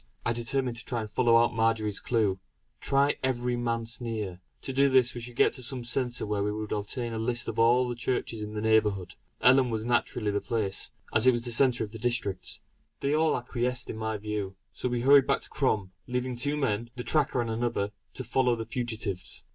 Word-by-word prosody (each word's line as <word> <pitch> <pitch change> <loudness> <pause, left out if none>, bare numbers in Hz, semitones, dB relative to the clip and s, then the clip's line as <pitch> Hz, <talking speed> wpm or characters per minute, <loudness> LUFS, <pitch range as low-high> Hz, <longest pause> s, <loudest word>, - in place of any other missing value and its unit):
I 115 - +2
determined 120 +1 -2
to 125 - -4
try 120 -3 -2
to - - -6
follow 115 +2 +4
out 115 0 +3
Marjory's 110 -2 +1
clue. 105 -6 +1 0.4
"Try 140 +1 +2
every 125 -1 0
Manse 115 0 -2
near." 105 -6 -4 0.2
To 135 - -4
do 140 +1 +4
this 130 -1 +4
we 120 - -6
should 120 0 -8
get - - +4
to - - -8
some 125 0 -4
centre 125 0 -1
where 105 -1 -1
we 105 - 0
could 105 0 -4
obtain 115 +3 -3
a 110 - -3
list 120 +1 -2
of 115 - -3
all 120 +2 +4
the 120 - -2
churches 120 -2 -2
in 105 0 -6
the 105 - -2
neighbourhood. 105 -5 +2 0.3
Ellon 130 +1 +5
was 110 -1 -2
naturally 120 -2 0
the 100 - -1
place, 105 -5 0 0.2
as 110 +3 +4
it - - +9
was 120 - -1
in 120 - 0
the - - +1
centre 125 0 +4
of 105 - -6
the 115 - -8
district. 100 - -1 0.4
They 140 +1 +1
all 155 +1 +3
acquiesced 125 0 -2
in - - -7
my 110 0 -2
view; 105 -2 -4 0.2
so 125 - -2
we 120 -1 -1
hurried 140 +1 +6
back 140 - +2
to - - -9
Crom, 110 -9 0 0.2
leaving 125 0 -2
two 145 +5 0
men, 120 -5 -1
the 125 - -5
tracker 150 -3 +1
and 115 -1 -1
another, 110 -3 -1 0.2
to 130 - -4
follow 125 0 +2
the 115 -1 -5
fugitives. 110 -6 -4
120 Hz, 220 wpm, -28 LUFS, 110-125 Hz, 0.4 s, it